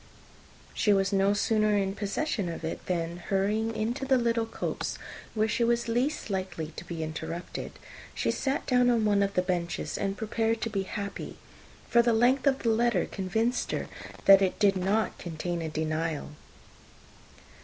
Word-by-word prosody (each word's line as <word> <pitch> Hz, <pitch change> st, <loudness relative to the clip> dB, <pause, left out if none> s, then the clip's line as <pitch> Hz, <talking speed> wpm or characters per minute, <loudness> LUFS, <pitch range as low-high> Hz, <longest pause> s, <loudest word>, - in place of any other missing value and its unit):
She 210 Hz, -, +3 dB
was 195 Hz, 0 st, +2 dB
no 195 Hz, +1 st, +3 dB
sooner 215 Hz, 0 st, +2 dB
in 195 Hz, -1 st, 0 dB
possession 205 Hz, -, -2 dB
of 165 Hz, -, -6 dB
it, 160 Hz, -, -4 dB
than 170 Hz, -1 st, -1 dB
hurrying 210 Hz, +5 st, 0 dB
into 230 Hz, +5 st, -2 dB
the 265 Hz, -1 st, +3 dB
little 230 Hz, -1 st, +1 dB
copse, -, -, -3 dB, 0.4 s
where 215 Hz, 0 st, +2 dB
she 235 Hz, +2 st, +1 dB
was 235 Hz, 0 st, +1 dB
least 245 Hz, +1 st, 0 dB
likely 185 Hz, -5 st, -3 dB
to -, -, -5 dB
be 170 Hz, -2 st, -5 dB
interrupted, 160 Hz, +2 st, -5 dB, 0.4 s
she -, -, +1 dB
sat 270 Hz, 0 st, -1 dB
down 250 Hz, -1 st, +4 dB
on 230 Hz, -3 st, +3 dB
one 205 Hz, -1 st, +3 dB
of 200 Hz, 0 st, 0 dB
the 180 Hz, -, +3 dB
benches, 175 Hz, -2 st, -2 dB
and 195 Hz, 0 st, -1 dB
prepared 225 Hz, +1 st, 0 dB
to 225 Hz, -, -2 dB
be 200 Hz, -2 st, 0 dB
happy; 200 Hz, +1 st, -5 dB, 0.5 s
for 235 Hz, -, +5 dB
the 235 Hz, 0 st, +2 dB
length 250 Hz, +5 st, +3 dB
of 270 Hz, -1 st, +2 dB
the 230 Hz, -, +2 dB
letter 225 Hz, -4 st, +2 dB
convinced 220 Hz, +6 st, -1 dB
her -, -, -1 dB, 0.4 s
that 195 Hz, 0 st, +9 dB
it 190 Hz, -1 st, +1 dB
did 200 Hz, -2 st, +4 dB
not 195 Hz, +4 st, 0 dB
contain 175 Hz, 0 st, -3 dB
a 160 Hz, -, -3 dB
denial. 155 Hz, 0 st, -2 dB
205 Hz, 170 wpm, -28 LUFS, 180-230 Hz, 0.5 s, that